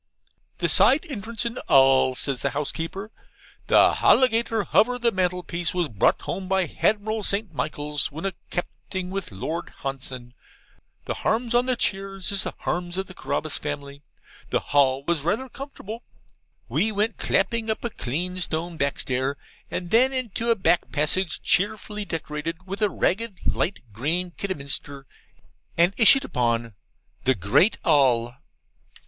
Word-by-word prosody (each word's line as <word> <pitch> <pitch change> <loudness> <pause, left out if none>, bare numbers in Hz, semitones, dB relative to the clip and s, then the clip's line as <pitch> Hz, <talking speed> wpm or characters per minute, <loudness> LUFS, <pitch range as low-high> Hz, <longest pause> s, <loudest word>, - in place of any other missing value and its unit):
'The - - 0
side 295 +6 +6
entrance 230 -2 -3
and 235 +1 -3
All,' 135 -1 +5
says 135 -1 -1
the 140 - +1
housekeeper. 165 +8 -4 0.6
'The - - +6
halligator 230 -4 +4
hover 245 +5 +3
the 240 -1 +2
mantelpiece 180 -2 -1
was 175 -4 0
brought 105 -5 +2
home 190 -1 -4
by 190 -1 +2
Hadmiral 210 +7 0
St. 200 -2 0
Michaels, 150 -1 -2
when 160 +6 -6
a 195 - -1 0.2
Capting 180 +1 -4
with 195 -7 -4
Lord 160 - -4
Hanson. 130 -2 -5 0.7
The - - -2
harms 235 +2 -1
on 245 +1 +3
the 255 - +2
cheers 195 -3 -1
is 200 -1 +1
the - - -4
harms 175 0 -3
of 190 - -1
the 185 - -12
Carabas 155 -3 -3
family.' 145 -1 -6 0.5
The - - +1
hall 135 -1 +4
was 170 -3 +1
rather 205 - -1
comfortable. 245 -5 -8 0.7
We 220 - +1
went 215 +1 -1
clapping 225 +3 +1
up 220 - -2
a 235 - -2
clean 180 +9 -3
stone 165 0 -3
backstair, 135 -1 -1 0.3
and 175 -1 -4
then 255 +4 +5
into 235 -3 -3
a 230 - +5
back 175 -4 +1
passage 160 +4 0
cheerfully 210 +1 0
decorated 165 +1 -4
with 195 +2 -6
ragged 210 +1 0
light 195 - -1
green 165 - -1
Kidderminster, 140 -6 -3 0.7
and 175 +3 +4
issued 270 +4 +6
upon 115 - 0 0.5
'THE 130 0 +4
GREAT 100 - +3
ALL. 125 -6 +3
180 Hz, 145 wpm, -24 LUFS, 145-215 Hz, 0.7 s, side